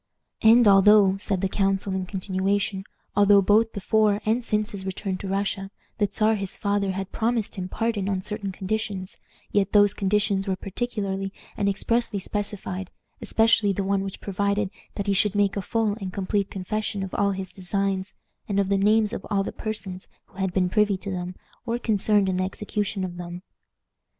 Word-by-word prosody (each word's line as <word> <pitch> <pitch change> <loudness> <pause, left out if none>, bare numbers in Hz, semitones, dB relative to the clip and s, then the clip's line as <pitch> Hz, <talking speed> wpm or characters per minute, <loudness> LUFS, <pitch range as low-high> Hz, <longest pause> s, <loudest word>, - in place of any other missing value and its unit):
"And 225 +1 +7
although," 200 0 +6
said 195 -2 -1
the 195 - +2
council, 195 0 0
in 190 -1 -2
continuation, 195 +1 -1 0.3
"although, 205 0 +6
both 220 +3 +4
before 210 0 +2
and 225 +3 +1
since 210 -1 0
his 200 -2 -6
return 190 0 -3
to 195 - -5
Russia, 195 0 -2 0.3
the 205 - +3
Czar 215 +2 +2
his 195 -3 -3
father 200 -1 0
had 195 0 -4
promised 230 -1 0
him 185 -1 -5
pardon 215 -3 -1
on 190 -1 -1
certain 210 -1 -4
conditions, 195 0 -3 0.3
yet 200 -1 +1
those 205 -1 +6
conditions 200 0 +1
were 190 - +1
particularly 195 -1 -3 0.2
and 200 -1 +1
expressly 225 +2 0
specified, 195 -2 -4 0.3
especially 225 -2 +3
the 195 - -2
one 195 0 +1
which 195 -1 -6
provided 200 0 0 0.2
that 200 - -3
he 200 - +2
should 205 +1 +2
make 205 -1 +2
a 200 - -1
full 220 +2 0
and 190 -1 -4
complete 200 +1 -1
confession 200 +1 -3
of 190 - -6
all 200 0 +2
his 190 -1 -6
designs, 195 +1 -2 0.3
and 200 0 +1
of 195 -1 +1
the 200 -1 +2
names 215 +2 +3
of - - -4
all 200 -2 +1
the - - -4
persons 210 -4 -5 0.2
who - - -22
had 190 -1 0
been 180 0 +2
privy 205 +1 +2
to 200 +1 -6
them 180 0 -4 0.3
or 235 0 -1
concerned 210 -3 +2
in 185 -1 0
the 185 - +1
execution 200 +1 -3
of 175 -1 -5
them. 175 +1 -7
200 Hz, 185 wpm, -25 LUFS, 190-210 Hz, 0.3 s, And